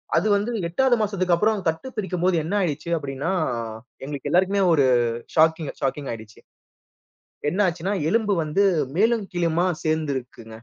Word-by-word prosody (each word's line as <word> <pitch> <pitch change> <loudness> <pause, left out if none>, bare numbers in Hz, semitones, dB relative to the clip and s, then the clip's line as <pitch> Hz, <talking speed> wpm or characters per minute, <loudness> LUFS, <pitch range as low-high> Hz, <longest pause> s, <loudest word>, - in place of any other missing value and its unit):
அது 215 - +2
வந்து 210 +4 -1 0.2
8வது 250 +8 +2
மாசத்துக்கப்புறம் 200 +1 +1
கட்டுப் 165 +11 -3
பிரிக்கும்போது 185 -3 0
என்ன 170 +6 -4
ஆயிடுச்சு, 165 -2 -2
அப்பிடீன்னா, 140 +4 -3 0.7
எங்களுக்கு 140 -1 -5
எல்லாருக்குமே 190 +3 +2
ஒரு 140 -4 +4 0.5
ஷாக்கிங் 160 -1 +3
ஷாக்கிங் 135 +1 -2
ஆகிடுச்சு. 110 -1 -9 1.1
என்ன 185 +6 -1
ஆச்சுன்னா, 175 +3 -2 0.2
எலும்பு 220 -2 +2
வந்து 175 +7 +1 0.3
மேலும் 225 -1 +2
கீழுமா 170 +1 +1 0.2
சேர்ந்துருக்குங்க. 140 -7 -2
175 Hz, 125 wpm, -23 LUFS, 150-200 Hz, 1.1 s, ஒரு